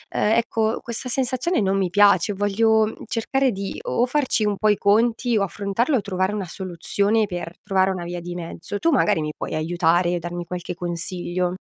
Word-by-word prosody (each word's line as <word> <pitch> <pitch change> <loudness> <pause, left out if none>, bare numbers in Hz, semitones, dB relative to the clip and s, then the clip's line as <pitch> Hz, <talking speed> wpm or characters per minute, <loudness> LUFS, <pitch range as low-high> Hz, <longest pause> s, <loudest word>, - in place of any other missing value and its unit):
uhm, - - 0 0.2
ecco, 225 -1 0
questa 235 +2 -5
sensazione 260 +5 0
non 195 -1 +1
mi 190 -2 +1
piace. 200 0 +4
Voglio 215 +2 +2
cercare 255 +4 0
di 195 -1 -5
o 240 - +1
farci 260 -5 +1
un 205 -2 0
po' 215 - +2
i 210 - +3
conti, 225 +3 +2
o 200 - +2
affrontarlo, 205 - 0
o 220 - -1
trovare 190 -1 -1
una 205 -3 -3
soluzione 200 +5 0
per 175 -2 -5
trovare 190 -1 +2
una 180 -2 -4
via 175 0 -4
di 175 +1 -6
mezzo. 175 +3 -6
Tu 335 - +2
magari 210 - +3
mi 150 0 -3
puoi - - -5
aiutare 175 +2 +1
e 175 - -1
darmi 175 +1 -5
qualche 180 0 -5
consiglio? 175 +1 -3
200 Hz, 190 wpm, -23 LUFS, 175-220 Hz, 0.2 s, piace